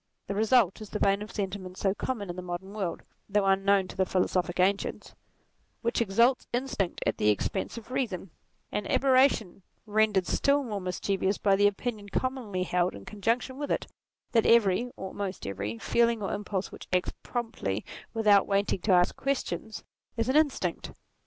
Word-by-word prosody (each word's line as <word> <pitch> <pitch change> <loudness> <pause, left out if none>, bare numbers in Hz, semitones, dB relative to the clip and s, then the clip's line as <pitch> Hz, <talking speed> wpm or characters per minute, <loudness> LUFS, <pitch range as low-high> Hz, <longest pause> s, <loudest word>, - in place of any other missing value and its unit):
The 200 - -3
result 220 -1 +3
is 215 - -8
the - - -3
vein 200 0 +2
of 210 - -7
senti 200 -1 -3
ment 185 0 -10
so 195 -1 +1
common 205 -4 -3
in - - -8
the 180 - -5
modern 180 +2 -6
world 195 -5 -3 0.3
(though 205 0 +2
unknown 195 0 +3
to - - -9
the 190 - +2
philosophic 185 -1 0
ancients) 195 +2 0 0.7
which 235 +1 +1
exalts 235 +5 +3
instinct 240 -7 -2
at 110 - 0
the 105 - +3
expense 105 - -1
of 230 +1 -10
reason; 195 -9 -2 0.4
an 210 - -2
aberration 260 -8 +3 0.2
rendered 210 -3 +2
still 280 +7 +2
more 210 -6 -4
mischievous 190 +2 -1
by 200 -2 +3
the 205 +1 +5
opinion 205 0 -3
commonly 235 -7 -2
held 180 0 0
in 100 -1 -10
con 210 - -10
junction 250 +5 0
with 290 - -3
it, - - 0 0.5
that 225 -2 +3
every, 230 0 +4
or 190 - -5
almost 195 -1 -5
every, 100 +3 -4
feeling 235 - +2
or 195 - -2
impulse 205 -2 -3
which - - -10
acts 180 0 +1
promptly 225 - -3 0.3
without 210 -3 +4
waiting 200 -1 +1
to 205 - +1
ask 180 0 +4
questions, 270 -5 -3 0.3
is 230 - 0
an 260 - +2
instinct. 305 -3 +1
200 Hz, 180 wpm, -28 LUFS, 185-230 Hz, 0.7 s, the